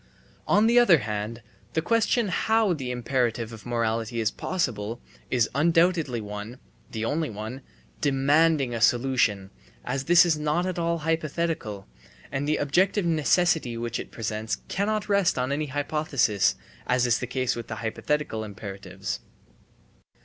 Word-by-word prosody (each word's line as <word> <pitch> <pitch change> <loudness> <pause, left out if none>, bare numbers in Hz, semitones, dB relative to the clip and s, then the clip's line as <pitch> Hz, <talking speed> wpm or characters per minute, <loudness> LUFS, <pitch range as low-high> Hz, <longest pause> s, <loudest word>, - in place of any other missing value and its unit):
On 210 - +4
the 235 +2 +6
other 195 -9 +6
hand, 110 -1 -4 0.3
the 160 - +1
question 230 +1 +2
how 220 +1 +2
the 135 -6 -4
imperative 120 -2 -1
of 115 +1 -10
morality 115 -1 -1
is 110 -1 +1
possible, 115 - -2 0.3
is 120 -3 +2
undoubtedly 165 -4 +2
one, 105 +3 -7 0.3
the 110 -1 -3
only 155 +6 -1
one, 110 +5 -6 0.4
demanding 145 -1 +3
a 115 - -3
solution, 120 -6 +2 0.3
as 135 +2 -2
this 175 +1 +7
is 160 -3 +1
not 150 +4 0
at 185 -2 -2
all 170 0 0
hypothetical, 160 - -2 0.5
and 135 +2 -2
the 155 - +2
objective 185 +7 +2
necessity 160 -5 +2
which 120 0 -3
it - - -7
presents 110 -1 -3
cannot 210 +2 -1
rest 200 -6 +2
on 125 +1 -1
any 150 +2 -1
hypothesis, 140 -7 +1 0.3
as 125 0 +2
is 120 -1 +2
the 125 - -4
case 130 0 -1
with 120 - -6
the 110 - -5
hypothetical 110 +2 -2
imperatives. 100 -2 -6
135 Hz, 145 wpm, -26 LUFS, 115-165 Hz, 0.5 s, this